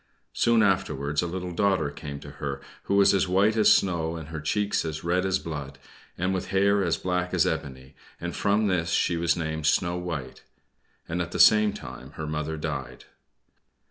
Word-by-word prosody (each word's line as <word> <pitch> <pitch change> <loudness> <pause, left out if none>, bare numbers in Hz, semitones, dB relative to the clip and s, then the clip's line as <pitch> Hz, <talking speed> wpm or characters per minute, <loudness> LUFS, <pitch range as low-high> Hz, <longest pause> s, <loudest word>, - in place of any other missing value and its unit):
Soon 115 -2 +3
afterwards 80 -7 0
a 85 - -2
little 90 +1 -4
daughter 90 -5 +1
came 70 -1 -7
to - - -10
her, 70 -1 -3 0.3
who 100 - 0
was 100 0 +5
as 95 -1 +2
white 100 +4 +3
as 110 -2 +5
snow, 85 -3 +2
and 80 -2 -8
with 75 -1 -6
cheeks 105 +4 0
as 80 -1 -5
red 90 +2 +1
as 95 0 +2
blood, 75 -6 -6 0.4
and 95 +2 0
with 95 - -3
hair 100 +1 +2
as 85 -3 +1
black 90 0 -2
as 90 - +3
ebony, 65 -4 -4 0.3
and 85 0 -5
from 105 +1 +1
this 90 -4 0
she 85 - +1
was 85 0 +1
named 80 -2 -2
"Snow 85 +2 +2
White." 80 -8 -5 0.7
And 85 +2 -2
at 85 - -3
the - - -3
same 105 -1 +6
time - - -10
her 80 - -6
mother 75 +1 -3
died. 75 - -5
85 Hz, 190 wpm, -26 LUFS, 80-95 Hz, 0.7 s, same